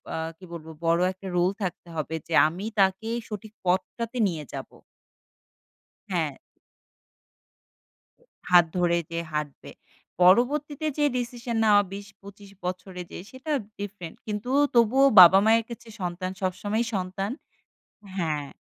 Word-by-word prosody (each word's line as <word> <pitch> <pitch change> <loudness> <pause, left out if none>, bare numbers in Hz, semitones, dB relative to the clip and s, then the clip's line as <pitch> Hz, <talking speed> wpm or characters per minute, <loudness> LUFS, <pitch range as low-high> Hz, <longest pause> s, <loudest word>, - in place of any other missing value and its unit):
আ - - -2 0.2
কি - - -20
বলবো? 160 -1 -8
বড় 170 +1 +3
একটা 190 +1 -10
রোল 175 +2 +3
থাকতে 180 -1 -4
হবে 155 0 -3
যে 170 - -5
আমি 175 +6 -6
তাকে 195 +3 +2 0.2
সঠিক 215 0 -8
পথটাতে 220 +7 -1
নিয়ে 165 -5 -4
যাবো। - - -7 1.4
হ্যাঁ। - - -1 2.1
হাত 175 -1 +8
ধরে 175 -1 +2
যে 165 - -2
হাঁটবে। 150 -2 -5 0.5
পরবর্তীতে 280 - +3
যে 295 - +3
ডিসিশন 240 -1 -4
নেওয়া 205 -2 +6
২০-২৫ 200 0 -11 0.2
বছরে 180 0 -5
যে - - -7
সেটা 260 +4 -7 0.3
ডিফারেন্ট। 200 -5 -7
কিন্তু 210 +4 -4 0.3
তবুও 240 +4 +5
বাবা-মায়ের 205 +6 +7
কাছে 235 0 -9
সন্তান 180 +1 -3
সবসময়ই 205 +5 -1
সন্তান 190 +2 -3 0.9
হ্যাঁ। 150 -5 -2
195 Hz, 120 wpm, -26 LUFS, 175-220 Hz, 2.1 s, হাত